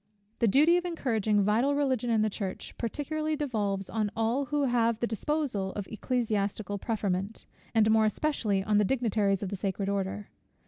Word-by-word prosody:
The 230 - +3
duty 305 - +5
of 355 - -2
encouraging 220 - +1
vital 235 +8 +2
Religion 260 -4 0
in 220 -2 +3
the 215 - +2
Church 195 -2 -5
particularly 305 +6 -2
devolves 210 -9 -2
on 215 -2 -1
all 230 +5 0
who 295 +1 0
have 235 -3 +2
the 235 - +1
disposal 230 -4 -2
of 205 - -4
ecclesiastical 215 -3 -2
preferment, 200 -1 -2 0.3
and 220 -1 +5
more 220 0 +4
especially 215 -4 0
on 210 +1 +2
the - - +4
dignitaries 205 -4 +1
of 195 - -3
the 200 - -3
sacred 195 0 -2
order. 200 +1 -3
220 Hz, 170 wpm, -29 LUFS, 200-260 Hz, 0.3 s, duty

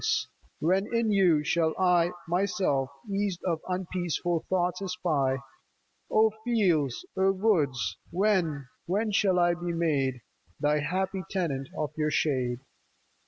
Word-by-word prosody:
Oh, - - -3 0.6
when 190 +5 +2
in 230 -2 +1
you 180 -7 +4
shall 160 +1 +1
I 180 -2 +3 0.2
Myself 175 -7 +1 0.2
eased 200 -3 -1
of 170 -3 0
unpeaccful 175 -2 -2
thoughts 180 0 0
espy? 160 -8 0 0.7
O 220 0 +4
fields! 175 - +1
O 190 0 +3
woods! 150 - +1
when, 175 -7 +1 0.2
when 210 +5 0
shall 195 -2 +3
1 175 -1 +2
be 175 -1 -1
made 140 -7 0 0.4
The 150 +1 +2
happy 185 +5 -1
tenant 145 -8 -2
of 150 -3 -2
your 155 -1 +1
shade 130 -5 0
175 Hz, 125 wpm, -28 LUFS, 150-190 Hz, 0.7 s, you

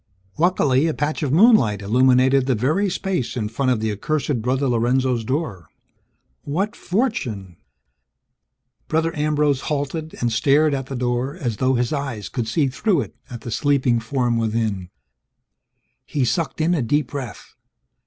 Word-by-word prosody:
Luckily, 155 -5 +3
a 160 - -1
patch 150 +2 -2
of 145 -4 -1
moonlight 150 - +4
illuminated 130 +4 +3
the 130 - +2
very 155 - +1
space 180 - -2
in 105 -3 -2
front 130 +4 -1
of 115 -4 0
the 110 -1 0
accursed 140 +4 -1
Brother 130 +4 0
Lorenzo's 125 0 +1
door. 120 - -3 0.7
What 195 +10 -2
fortune! 125 - -2 1.3
Brother 160 +1 0
Ambrose 150 -2 +1
halted 155 +2 -3
and 120 -1 0
stared 140 +6 +3
at 135 -2 -3
the 135 - -5
door 125 +3 -1
as 120 - -3
though 130 +3 +2
his 120 +4 0
eyes 135 -8 -4
could 120 -4 -3
see 140 +5 +1
through 155 - +1
it, - - -8
at 120 -2 -8
the 120 - -7
sleeping 135 -3 +2
form 120 0 0
within. 110 -5 -1 1.1
He 140 -4 -1
sucked 160 +5 -1
in 165 +3 +2
a 160 - +1
deep 145 +3 0
breath. 135 -6 -7
130 Hz, 155 wpm, -21 LUFS, 120-150 Hz, 1.3 s, moonlight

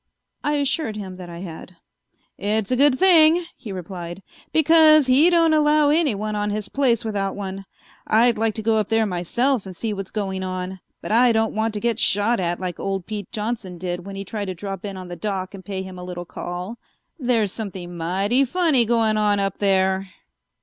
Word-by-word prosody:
I 295 - 0
assured 285 -4 0
him 190 -3 -7
that 180 -1 -9
I 170 0 -8
had. 180 0 -9 0.6
"It's 210 +2 -1
a - - +3
good 275 0 +4
thing," 340 -1 +5
he 225 -5 -9
replied, 180 0 -7 0.3
"because 315 -1 +6
he 270 +6 +5
don't 335 -2 +4
allow 300 -1 +4
anyone 215 -10 0
on 210 0 -1
his 210 0 -3
place 240 -4 +1
without 200 -3 -2
one. 195 -1 -6 0.4
I'd 235 +2 +4
like 225 0 0
to 220 - -3
go 225 0 +2
up 210 - -2
there 225 -1 +2
myself 215 +7 0
and 185 - -8
see 220 +3 -3
what's 195 -1 -6
going 195 -3 -3
on, 185 0 -4 0.2
but - - -5
I 240 +2 +5
don't 225 0 +1
want 220 0 -1
to - - -1
get 235 0 -1
shot 205 +4 +2
at 175 -1 -1
like 180 -2 -4
old 195 -2 -3
Pete 210 -3 -6
Johnson 215 -5 -4
did 175 0 -4
when 195 +1 -8
he 195 0 -6
tried 205 +1 -4
to 185 -1 -5
drop 195 +2 -6
in 200 -2 -5
on 185 -1 -8
the 175 - -7
Doc 190 0 -4
and 195 -1 -10
pay 190 0 -4
him 185 -1 -9
a - - -7
little 175 -1 -6
call. 180 +6 -6 0.4
There's 235 -6 +1
something 185 -5 -7
mighty 195 +10 +1
funny 290 -3 +2
going 225 -2 +2
on 205 -1 +2
up 195 -1 -2
there." 190 -1 +1
205 Hz, 205 wpm, -22 LUFS, 190-240 Hz, 0.6 s, because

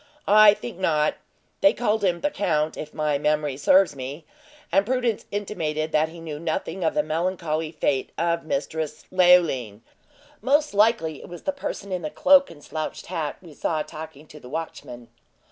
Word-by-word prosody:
"I 210 0 +7
think 125 +5 -8
not; 155 -5 +2 0.5
they 295 - +6
called 220 -3 0
him 175 -3 +1
the 295 - 0
count, 155 - 0
if 150 - -7
my 150 -2 0
memory 150 -2 0
serves 180 +3 +4
me, 140 +4 -7 0.5
and 195 - +4
Prudence 245 -1 -1
intimated 160 -7 -3
that 155 +1 +2
he 170 +1 -11
knew 155 -3 -6
nothing 165 +2 -3
of 160 - +1
the 150 - +2
melancholy 160 -1 -2
fate 140 -4 -1
of 170 0 0
Mistress 155 +1 -3
Leoline. 170 - +3 0.6
Most 290 +3 +2
likely 200 -8 +2
it - - -12
was 175 -1 -10
the 285 - 0
person 210 -8 -6
in 180 -1 -2
the 155 - -3
cloak 280 - +5
and 145 -3 -14
slouched 155 +1 -5
hat 165 -5 -3
we 165 -4 -12
saw 155 +1 -1
talking 155 -1 -10
to 150 0 -13
the 125 - -12
watchman." 125 -6 -7
160 Hz, 175 wpm, -24 LUFS, 150-190 Hz, 0.6 s, I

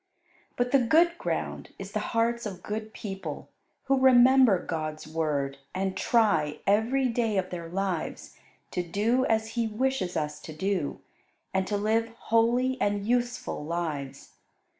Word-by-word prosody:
But 245 0 0
the 275 - +6
good 330 +8 +4
ground - - -3
is - - -8
the - - -1
hearts 235 0 0
of 185 -3 -8
good 215 +1 -4
people, 195 -8 -6 0.3
who 270 0 +2
remember 260 -3 +6
God's 155 -2 -4
Word 145 -4 -1 0.2
and 190 0 -1
try, 165 -11 +2
every 230 +6 +2
day 230 -3 0
of 185 -1 -1
their 170 -2 -5
lives, 185 -2 -3 0.4
to 180 - -1
do 210 +9 +1
as 220 0 +1
He 230 0 -1
wishes 220 -4 -1
us 150 -1 -2
to 155 - -9
do, 185 -1 -2 0.5
and 190 0 0
to 205 - 0
live 220 +2 +1
holy 240 +3 +2
and 205 0 0
useful 245 -7 -1
lives. 150 -5 -4
210 Hz, 145 wpm, -28 LUFS, 170-240 Hz, 0.5 s, the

